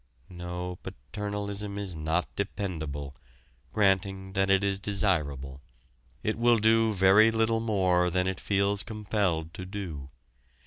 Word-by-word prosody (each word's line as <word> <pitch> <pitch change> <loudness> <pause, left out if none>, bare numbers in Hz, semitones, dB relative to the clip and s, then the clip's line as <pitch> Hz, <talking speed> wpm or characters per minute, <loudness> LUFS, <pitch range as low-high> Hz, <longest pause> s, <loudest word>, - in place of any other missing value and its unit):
No, 90 0 -5
paternalism 100 - -5
is 100 -4 -4
not 80 +3 0
dependable, 80 -9 -4 0.6
granting 95 -1 +1
that 95 0 +1
it 95 0 +4
is 100 -1 +1
desirable. 75 -10 -1 0.6
It 110 +1 -1
will 120 0 +5
do 110 +1 +4
very 100 +2 +6
little 115 0 +2
more 95 -5 +2
than 90 +1 +1
it 95 -1 -2
feels 100 0 +1
compelled 100 -7 -1
to 90 - -7
do. 90 -8 -6
95 Hz, 125 wpm, -28 LUFS, 90-105 Hz, 0.6 s, very